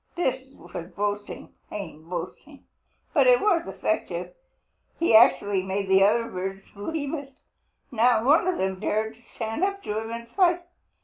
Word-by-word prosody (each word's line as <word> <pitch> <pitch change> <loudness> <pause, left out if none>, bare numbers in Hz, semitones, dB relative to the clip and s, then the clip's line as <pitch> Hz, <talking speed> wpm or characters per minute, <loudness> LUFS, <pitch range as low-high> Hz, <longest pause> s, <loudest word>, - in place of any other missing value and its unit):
This 265 -5 -2
was 175 0 -8
boasting, 205 0 -3 0.2
plain 170 -6 -8
boasting, 180 - -7 0.5
but - - +4
it - - +7
was 360 -5 +2
effective. - - -2 0.6
He 330 -9 +3
actually 205 -4 +5
made 190 +1 -3
the 190 0 +6
other 230 +3 +3
birds 195 0 -5
believe 285 +8 -4
it. 280 -3 -6 0.6
Not 235 -1 +3
one 305 +6 +5
of 370 - +1
them 190 0 -1
dared 220 +2 -1 0.2
stand 225 +8 -3
up 395 0 -1
to 210 +1 -2
him 225 0 -6
and 235 0 -6
fight. 350 +2 +2
225 Hz, 150 wpm, -26 LUFS, 195-300 Hz, 0.6 s, it